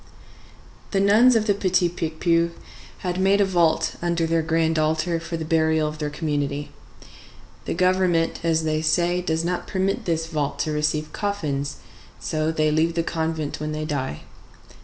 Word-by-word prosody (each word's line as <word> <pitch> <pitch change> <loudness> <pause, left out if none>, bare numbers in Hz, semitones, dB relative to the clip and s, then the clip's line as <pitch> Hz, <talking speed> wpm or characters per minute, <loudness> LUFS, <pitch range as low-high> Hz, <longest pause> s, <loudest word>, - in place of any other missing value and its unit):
The 195 - 0
nuns 220 +6 +5
of 220 -1 +2
the 205 - +3
Petit 185 -2 +2
Picpus 170 0 0 0.6
had 180 0 -1
made 195 +1 +4
a 200 - +4
vault 175 -4 +1
under 170 -1 0
their 165 0 +1
grand 160 0 +1
altar 160 +2 0
for 170 0 -5
the 160 - -4
burial 160 -1 +2
of 150 0 -6
their 150 -1 -2
community. 145 -2 -2 0.9
The - - -2
Government, 180 -2 +2
as 160 -1 +1
they 155 0 0
say, 175 +3 +1
does 165 -1 -1
not 180 0 -2
permit 195 0 -1
this 165 -2 0
vault 150 -3 -2
to 155 - -1
receive 150 0 -1
coffins 150 -9 -2 0.4
so 155 0 -1
they 155 -1 +1
leave 160 +2 +1
the 165 - +1
convent 160 -3 -2
when 155 0 -3
they 155 0 -3
die. 135 - -3
165 Hz, 165 wpm, -23 LUFS, 155-175 Hz, 0.9 s, nuns